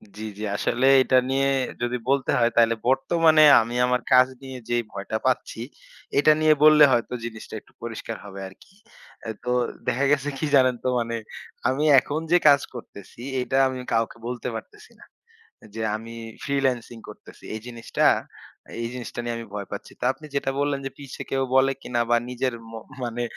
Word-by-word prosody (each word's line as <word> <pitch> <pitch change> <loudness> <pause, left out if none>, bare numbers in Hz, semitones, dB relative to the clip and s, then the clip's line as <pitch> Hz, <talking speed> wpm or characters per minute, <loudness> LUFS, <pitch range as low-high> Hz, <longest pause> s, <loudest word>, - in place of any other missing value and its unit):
জী, - - -9 0.2
জী। 105 - -6
আসলে 125 +5 0 0.2
এটা 130 +1 +3
নিয়ে 135 +1 +1 0.3
যদি 120 +1 -1
বলতে 135 -1 +1
হয়, 120 0 +3
তাইলে 115 0 +5
বর্তমানে 155 +4 +4 0.2
আমি 115 +2 -5
আমার 125 0 +1
কাজ 130 0 +7
নিয়ে 130 -1 -8
যেই 120 0 +1
ভয়টা 100 +2 -4
পাচ্ছি, 125 -3 -1 0.6
এটা 150 +2 +6
নিয়ে 155 0 +6
বললে 155 -1 +8
হয়তো 120 0 0
জিনিসটা 110 -2 -8
একটু - - -27
পরিষ্কার 115 -1 -6
হবে 100 -1 -9
আরকি। 95 - -18 0.7
তো 125 - -2 0.4
দেখা 135 +3 +1
গেছে 145 0 +1
কি - - -2
জানেন? 130 -2 +4
তো - - -1
মানে 115 0 -2 0.5
আমি 135 +3 -1 0.2
এখন 145 +4 -4
যে 175 - +7
কাজ 140 -2 +6
করতেছি, 115 -2 -11 0.2
এটা 130 +1 -1
আমি 130 -1 -4
কাউকে 115 0 0
বলতে 125 0 -4
পারতেছি 415 - -10
না। - - -15 0.7
যে 115 - -4
আমি 115 +1 -8 0.3
ফ্রিল্যান্সিং 130 -4 -1
করতেছি। - - -14
এই - - -5
জিনিসটা 120 -1 -2 0.8
এই 115 - -2
জিনিসটা 125 -1 -7
নিয়ে 120 0 -3
আমি 115 - -7
ভয় 100 -2 -5
পাচ্ছি। - - -7
তো - - -6
আপনি 155 - -14
যেটা 135 -1 0
বললেন, 145 -1 0
যে - - -2
পিছে 140 -2 -9
কেউ 135 0 +1
বলে 135 +1 +5
কিনা, 120 -1 -2
বা 120 - +4
নিজের 125 0 -2 0.2
মো 115 - -7 0.2
মানে 120 0 -3
125 Hz, 175 wpm, -24 LUFS, 115-135 Hz, 0.8 s, বললে